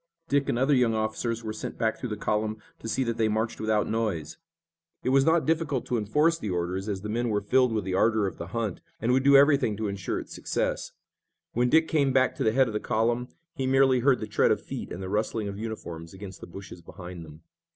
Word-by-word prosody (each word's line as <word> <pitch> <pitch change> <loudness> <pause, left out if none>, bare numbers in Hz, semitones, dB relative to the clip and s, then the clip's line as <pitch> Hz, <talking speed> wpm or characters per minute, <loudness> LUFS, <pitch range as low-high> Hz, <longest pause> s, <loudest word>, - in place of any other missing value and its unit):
Dick 140 -2 +1
and - - +1
other 135 +4 +3
young 125 -4 +3
officers 110 +1 -2
were 110 -1 -4
sent 110 - -6
back 110 -2 0
through 125 - -4
the 105 - -3
column 110 +1 -1 0.2
to - - -7
see 130 +4 0
that 115 -2 -2
they 110 - +2
marched 110 +1 -1
without 110 -1 +1
noise. 100 -9 -2 0.6
It - - 0
was 135 +1 +4
not 165 0 +3
difficult 155 -5 0
to 125 - -1
enforce 150 +10 +2
the 105 - -4
orders, 90 +3 -2
as 95 -2 -3
the 105 - -5
men 120 +3 -1
were 105 -1 +1
filled 125 +4 +3
with 110 -2 -1
the 95 0 -3
ardor 110 +2 +3
of 95 - -4
the 85 - -5
hunt, 110 0 -3 0.2
and 115 +3 +1
would 130 +1 +4
do 140 0 +7
everything 140 -7 +4
to 110 -1 -2
insure 100 -2 -3
its - - -9
success. - - -2 0.6
When 125 +1 +2
Dick 160 +4 +4
came 140 -4 +2
back 130 -1 +3
to - - -1
the 110 - +3
head 130 +3 +4
of 115 - -5
the 105 - 0
column 120 +2 0 0.3
he 135 -5 -2
merely 135 -1 +4
heard 130 +1 +3
the - - -3
tread 105 - +2
of - - +2
feet - - -6
and 90 - -5
the - - -4
rustling 105 +1 -1
of 100 0 -6
uniforms 85 -6 -6
against 95 0 -9
the - - -8
bushes 90 0 -10
behind 90 0 -9
them. 80 +1 -13
110 Hz, 245 wpm, -27 LUFS, 100-130 Hz, 0.6 s, do